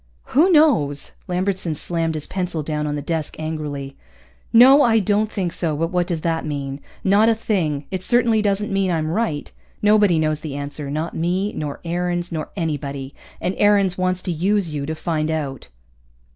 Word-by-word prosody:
"Who 325 Hz, +9 st, +5 dB
knows?" 230 Hz, -, +3 dB, 0.2 s
Lambertson 185 Hz, -2 st, -1 dB
slammed 165 Hz, +1 st, -2 dB
his 150 Hz, -, -1 dB
pencil 180 Hz, -4 st, -2 dB
down 150 Hz, 0 st, -2 dB
on 145 Hz, -, -2 dB
the 145 Hz, -, -4 dB
desk 160 Hz, -1 st, -3 dB
angrily. 150 Hz, -3 st, -5 dB, 0.6 s
"No, 260 Hz, +5 st, +8 dB
I 230 Hz, -4 st, +4 dB
don't 210 Hz, +1 st, +1 dB
think 180 Hz, -5 st, -2 dB
so, 160 Hz, -4 st, -1 dB
but 165 Hz, +3 st, -1 dB
what 180 Hz, -1 st, +1 dB
does 170 Hz, -3 st, -2 dB
that 165 Hz, 0 st, -1 dB
mean? 140 Hz, -2 st, -4 dB, 0.2 s
Not 205 Hz, +3 st, +4 dB
a 225 Hz, -, +3 dB
thing. 165 Hz, -10 st, -1 dB
It 190 Hz, -2 st, -3 dB
certainly 235 Hz, -2 st, +3 dB
doesn't 205 Hz, 0 st, 0 dB
mean 195 Hz, -1 st, +1 dB
I'm 160 Hz, -2 st, 0 dB
right. 175 Hz, -7 st, -2 dB, 0.3 s
Nobody 210 Hz, -4 st, +4 dB
knows 155 Hz, -1 st, +1 dB
the 155 Hz, -3 st, -6 dB
answer, 145 Hz, 0 st, -5 dB
not 155 Hz, +4 st, -3 dB
me, 185 Hz, +5 st, -1 dB
nor 145 Hz, -2 st, -5 dB
Aarons, 175 Hz, +1 st, -2 dB
nor 160 Hz, -2 st, -4 dB
anybody. 140 Hz, -5 st, -3 dB, 0.3 s
And 180 Hz, -, -1 dB
Aarons 200 Hz, -3 st, +4 dB
wants 185 Hz, 0 st, -1 dB
to 180 Hz, -, -2 dB
use 185 Hz, +3 st, +1 dB
you 145 Hz, -2 st, -4 dB
to 160 Hz, -, -2 dB
find 155 Hz, -1 st, -2 dB
out." 145 Hz, -5 st, -3 dB
170 Hz, 180 wpm, -21 LUFS, 150-200 Hz, 0.6 s, No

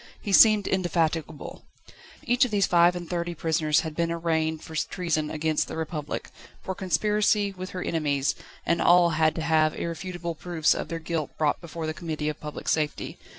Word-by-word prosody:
He 205 Hz, -, -5 dB
seemed 215 Hz, -1 st, +7 dB
indefatigable. 165 Hz, -4 st, -1 dB, 0.6 s
Each 245 Hz, +3 st, +3 dB
of 250 Hz, -, +1 dB
these 205 Hz, -3 st, +2 dB
five 175 Hz, -1 st, +4 dB
and 175 Hz, -1 st, -6 dB
thirty 175 Hz, 0 st, -3 dB
prisoners 155 Hz, -1 st, +1 dB
had 160 Hz, -3 st, -6 dB
been 170 Hz, 0 st, 0 dB
arraigned 160 Hz, -2 st, -1 dB
for 160 Hz, -, -9 dB
treason 155 Hz, -1 st, -1 dB
against 155 Hz, 0 st, 0 dB
the -, -, -6 dB
Republic, 155 Hz, -2 st, -4 dB, 0.3 s
for 190 Hz, -, -3 dB
conspiracy 205 Hz, +3 st, +1 dB
with 185 Hz, -1 st, -7 dB
her 180 Hz, -, -5 dB
enemies, 145 Hz, -4 st, 0 dB, 0.3 s
and 170 Hz, -, +1 dB
all 175 Hz, -1 st, +5 dB
had 155 Hz, 0 st, +2 dB
to 165 Hz, -, -3 dB
have 155 Hz, -1 st, +2 dB
irrefutable 170 Hz, 0 st, -4 dB
proofs 165 Hz, 0 st, +1 dB
of -, -, -4 dB
their 165 Hz, -, -4 dB
guilt 165 Hz, -2 st, -4 dB
brought 150 Hz, -2 st, +1 dB
before 170 Hz, -1 st, -6 dB
the 155 Hz, -, -2 dB
Committee 155 Hz, -2 st, -3 dB
of 150 Hz, -, -5 dB
Public 150 Hz, -1 st, -8 dB
Safety. 155 Hz, -2 st, -1 dB
165 Hz, 180 wpm, -26 LUFS, 155-180 Hz, 0.6 s, seemed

